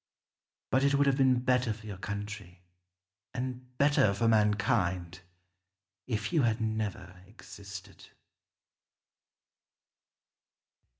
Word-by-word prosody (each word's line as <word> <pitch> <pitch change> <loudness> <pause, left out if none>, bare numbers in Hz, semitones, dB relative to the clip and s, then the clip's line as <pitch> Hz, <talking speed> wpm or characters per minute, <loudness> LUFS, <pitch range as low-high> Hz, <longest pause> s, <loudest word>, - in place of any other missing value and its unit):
But 130 +1 +3
it 140 0 +3
would 140 0 +3
have 135 -1 +2
been 130 -2 +4
better 125 -2 +2
for 110 0 -14
your 100 -3 -7
country, 100 -3 -6 0.7
and 125 0 -5
better 140 -8 +4
for 115 +3 +1
mankind, 105 -5 +1 0.9
if 110 -3 -2
you 160 - +4
had 115 -2 +1
never 105 -4 -3
existed. 100 -2 -11
110 Hz, 100 wpm, -30 LUFS, 100-125 Hz, 0.9 s, been